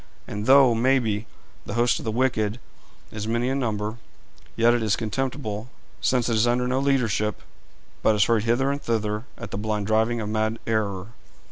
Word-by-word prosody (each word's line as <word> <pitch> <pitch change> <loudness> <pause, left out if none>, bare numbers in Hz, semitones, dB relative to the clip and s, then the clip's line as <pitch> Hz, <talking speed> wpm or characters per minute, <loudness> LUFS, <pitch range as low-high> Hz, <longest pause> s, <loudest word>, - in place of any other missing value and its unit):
And 105 +1 -5
though, 135 -2 +7
maybe, 115 -3 +1 0.4
the 105 - -6
host 120 +1 +2
of - - -9
the 110 - -1
wicked 115 -2 0 0.5
is 105 0 -5
many 115 +2 0
in 135 +1 0
number, 110 -2 -2 0.6
yet 115 +1 +4
is 110 -4 +1
it - - -12
contemptible, 115 -1 -3 0.3
since 125 -2 +2
it 120 - +1
is 110 +2 +3
under 125 +1 +1
no 130 +1 +1
leadership, 120 -6 0 0.6
but 110 - +3
is 105 -2 +4
hurried 115 -1 +1
hither 130 +4 +2
and 140 +1 -3
thither 110 -1 -1
at 115 -5 -8
the 100 - -3
blind 105 -1 -2
driving 110 +2 +1
of 105 - -3
mad 110 +1 0
error. 105 -3 -1
115 Hz, 180 wpm, -24 LUFS, 105-125 Hz, 0.6 s, though